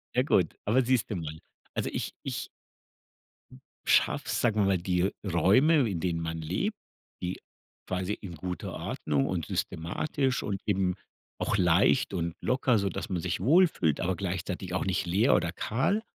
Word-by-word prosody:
Ja 125 Hz, -, +5 dB
gut, 90 Hz, -, +2 dB
aber 125 Hz, +5 st, +3 dB
siehst 120 Hz, -2 st, +1 dB
du 105 Hz, -, -2 dB
mal. 80 Hz, -2 st, -5 dB, 0.3 s
Also -, -, -1 dB
ich -, -, -3 dB
ich -, -, -4 dB, 1.4 s
schaffe -, -, +3 dB
es, -, -, 0 dB
sagen 110 Hz, -3 st, +2 dB
wir -, -, +3 dB
mal, 95 Hz, -1 st, +3 dB
die 90 Hz, +1 st, 0 dB
Räume, 115 Hz, -, +4 dB
in 90 Hz, -4 st, -2 dB
denen 85 Hz, -1 st, -1 dB
man 80 Hz, 0 st, -3 dB
lebt, 95 Hz, -, -2 dB, 0.4 s
die 90 Hz, +1 st, -3 dB, 0.5 s
quasi 95 Hz, +2 st, -1 dB
in 90 Hz, -6 st, -7 dB
guter 90 Hz, +3 st, -5 dB
Ordnung 70 Hz, -3 st, -1 dB
und 85 Hz, -5 st, -2 dB
systematisch 130 Hz, -, -1 dB
und 100 Hz, -2 st, -3 dB
eben 95 Hz, -3 st, +1 dB, 0.4 s
auch -, -, 0 dB
leicht 90 Hz, +6 st, +3 dB
und 85 Hz, -2 st, -2 dB
locker, 125 Hz, -2 st, +2 dB
sodass 100 Hz, -2 st, -3 dB
man 90 Hz, -3 st, -1 dB
sich 90 Hz, -2 st, -2 dB
wohlfühlt, 145 Hz, -, +4 dB
aber 90 Hz, 0 st, 0 dB
gleichzeitig 90 Hz, -1 st, -4 dB
auch 95 Hz, -, 0 dB
nicht 95 Hz, -2 st, 0 dB
leer 100 Hz, +9 st, +3 dB
oder 85 Hz, -, +1 dB
kahl 135 Hz, -, 0 dB
95 Hz, 165 wpm, -29 LUFS, 85-115 Hz, 1.4 s, Ja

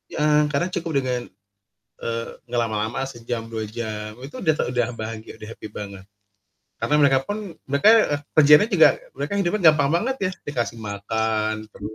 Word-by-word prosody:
heeh, 150 Hz, 0 st, +4 dB
kadang 150 Hz, +5 st, 0 dB
cukup 165 Hz, -6 st, -1 dB
dengan, 125 Hz, -1 st, -1 dB, 0.8 s
eee, 115 Hz, 0 st, -3 dB, 0.2 s
ngelama-lama, 115 Hz, +1 st, -1 dB
sejam, 120 Hz, -2 st, -5 dB
2 110 Hz, -1 st, -4 dB
jam, 110 Hz, -1 st, -5 dB
itu 135 Hz, +3 st, -10 dB
udah 160 Hz, -, +4 dB
te 125 Hz, -1 st, -1 dB
bahagia, 110 Hz, 0 st, -7 dB
udah 110 Hz, -, -9 dB
happy 110 Hz, -1 st, -9 dB
banget. 100 Hz, -2 st, -8 dB, 0.7 s
Karena 150 Hz, -, -1 dB
mereka 135 Hz, -2 st, +5 dB
pun 205 Hz, -4 st, -5 dB
mereka 140 Hz, +8 st, +3 dB, 0.5 s
kerjaannya 150 Hz, +7 st, +7 dB
juga -, -, +5 dB, 0.2 s
mereka -, -, -4 dB
hidupnya 180 Hz, -3 st, +5 dB
gampang 150 Hz, +2 st, +1 dB
banget 265 Hz, +3 st, -1 dB
ya, -, -, -1 dB, 0.2 s
dikasih 120 Hz, -4 st, -3 dB
makan, 110 Hz, +1 st, -2 dB
terus, 105 Hz, +2 st, -8 dB
120 Hz, 150 wpm, -23 LUFS, 110-150 Hz, 0.8 s, kerjaannya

